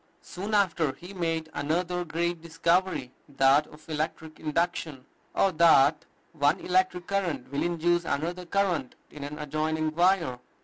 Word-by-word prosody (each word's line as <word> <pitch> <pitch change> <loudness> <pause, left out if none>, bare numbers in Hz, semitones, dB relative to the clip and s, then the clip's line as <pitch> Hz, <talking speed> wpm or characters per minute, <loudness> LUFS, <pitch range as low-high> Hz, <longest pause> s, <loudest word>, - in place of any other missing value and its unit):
Soon 200 +4 -4
after 170 -8 +2
he 175 +7 -11
made 165 -3 -2
another 175 +5 -1
great 170 0 -2
discovery, 170 -4 0 0.2
that 140 +2 +4
of 155 +1 -16
electric 160 0 -4
induction, 155 -3 -2 0.3
or 195 - +3
that 155 -2 +5 0.3
one 150 +3 +2
electric 180 -1 +1
current 170 -11 -2
will 140 - -1
induce 175 0 +1
another 170 +4 -3
current 180 -9 0 0.2
in 145 - -8
an 145 +1 -6
adjoining 155 +1 -1
wire. 170 -7 +2
165 Hz, 135 wpm, -27 LUFS, 150-175 Hz, 0.3 s, that